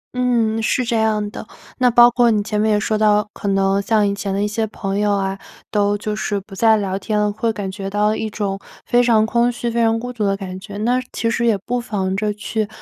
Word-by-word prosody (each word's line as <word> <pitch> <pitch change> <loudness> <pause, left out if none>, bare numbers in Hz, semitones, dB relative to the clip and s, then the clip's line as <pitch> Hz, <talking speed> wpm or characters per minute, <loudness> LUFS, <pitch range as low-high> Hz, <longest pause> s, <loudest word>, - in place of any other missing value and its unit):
嗯， 235 -3 +1
是 250 +3 +1
这 235 - -1
样 215 -1 +1
的。 - - -8 0.3
那 250 -1 +4
包 240 0 +7
括 240 0 +3
你 215 -2 +2
前 210 0 -1
面 215 0 +2
也 210 - +2
说 215 +1 -1
到， 210 -1 +3
可 205 - -6
能 195 0 +2
像 210 0 +2
以 200 - 0
前 200 0 -4
的 195 +1 -1
一 210 - +1
些 220 +1 -1
朋 200 -1 -3
友 210 0 +2
啊， 195 -1 -1 0.3
都 205 -1 +1
就 210 +1 -3
是 210 -1 -2
不 195 +1 -16
再 220 +2 +4
聊 195 -2 -2
天 215 0 -2
了， 210 0 +1
会 225 +2 -1
感 205 -3 -5
觉 195 0 -5
到 210 +2 +1
一 220 - -3
种 200 -2 -3 0.3
非 245 - +3
常 225 -3 +4
空 235 +2 +2
虚、 240 0 -3
非 235 - 0
常 225 0 +2
孤 245 +1 -6
独 225 -3 -3
的 195 0 +1
感 185 -1 -7
觉。 200 +1 -9
那 245 +4 +1
其 230 - -1
实 235 0 0
也 220 - +3
不 245 +5 -3
妨 190 -5 -2
着 210 +1 -1
去 210 +1 -3
210 Hz, 270 characters per minute, -19 LUFS, 200-230 Hz, 0.3 s, 包